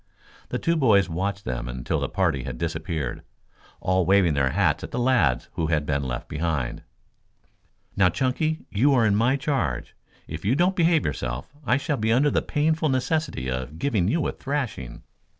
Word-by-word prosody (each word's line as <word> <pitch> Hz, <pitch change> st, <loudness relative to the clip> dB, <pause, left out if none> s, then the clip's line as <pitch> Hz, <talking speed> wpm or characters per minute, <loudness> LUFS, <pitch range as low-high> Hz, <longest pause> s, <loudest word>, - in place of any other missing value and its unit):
The -, -, -1 dB
two 170 Hz, -, +1 dB
boys 110 Hz, -10 st, +4 dB
watched 100 Hz, +3 st, -3 dB
them -, -, -3 dB
until -, -, -2 dB
the -, -, -2 dB
party 85 Hz, -8 st, +1 dB
had 65 Hz, -2 st, -6 dB
disappeared, 80 Hz, -3 st, -3 dB, 0.6 s
all 95 Hz, 0 st, +1 dB
waving 95 Hz, -2 st, +4 dB
their 70 Hz, -2 st, +2 dB
hats -, -, +1 dB
at -, -, -5 dB
the -, -, -5 dB
lads 120 Hz, -, +2 dB
who 80 Hz, -2 st, -1 dB
had 75 Hz, -2 st, +1 dB
been 70 Hz, -1 st, 0 dB
left 60 Hz, -3 st, -4 dB
behind. 75 Hz, -6 st, -2 dB, 1.1 s
"Now, 95 Hz, -3 st, +4 dB
Chunky, 135 Hz, -, -1 dB
you 135 Hz, +7 st, +3 dB
are 120 Hz, -3 st, +4 dB
in 105 Hz, -2 st, +3 dB
my 120 Hz, +5 st, +3 dB
charge. 130 Hz, -, -2 dB, 0.3 s
If -, -, -7 dB
you 110 Hz, +6 st, +2 dB
don't 180 Hz, +5 st, +2 dB
behave 165 Hz, -3 st, +3 dB
yourself, 65 Hz, -, -4 dB
I 120 Hz, 0 st, +2 dB
shall 145 Hz, +1 st, -1 dB
be 110 Hz, +1 st, 0 dB
under 140 Hz, +5 st, +4 dB
the -, -, +2 dB
painful 155 Hz, +1 st, +1 dB
necessity 135 Hz, -, -1 dB
of 65 Hz, +3 st, -4 dB
giving 100 Hz, -3 st, +1 dB
you 160 Hz, +8 st, +1 dB
a -, -, 0 dB
thrashing." 130 Hz, -, -4 dB
100 Hz, 180 wpm, -25 LUFS, -, 1.1 s, boys